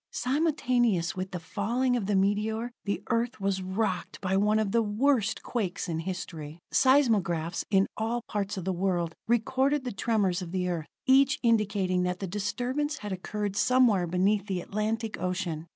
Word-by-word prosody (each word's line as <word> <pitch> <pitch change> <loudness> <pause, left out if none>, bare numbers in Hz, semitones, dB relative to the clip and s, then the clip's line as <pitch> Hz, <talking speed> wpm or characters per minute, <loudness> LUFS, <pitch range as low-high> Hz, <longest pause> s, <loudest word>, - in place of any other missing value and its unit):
Simultaneous 250 - +1
with 185 0 -3
the 180 - -5
falling 230 +9 0
of 220 -5 -2
the 205 - +1
meteor, 210 +4 0
the 200 - -2
Earth 235 +1 0
was 195 -1 0
rocked 185 -1 -2
by 190 0 -1
one 210 +2 +3
of 215 -2 0
the 230 - +3
worst 225 +1 +1
quakes 200 -6 -2
in 165 -2 -2
history. 165 -3 -6
Seismographs 200 - +2
in 195 -1 +4
all 230 +2 -1
parts 205 0 -2
of 185 - -5
the 190 - 0
world 175 -2 0
recorded 260 +5 +1
the 250 - -3
tremors 200 -3 0
of 175 -2 -6
the 180 -1 -1
Earth, 170 -3 -3 0.2
each 270 +2 +5
indicating 205 -5 +2
that 180 0 -1
the 195 - -3
disturbance 245 - -2
had 210 -1 -6
occurred 205 +2 -3
somewhere 210 -4 +3
beneath 195 +4 +1
the 190 -2 -1
Atlantic 215 +2 -3
ocean. 180 -3 -2
205 Hz, 170 wpm, -28 LUFS, 185-235 Hz, 0.2 s, each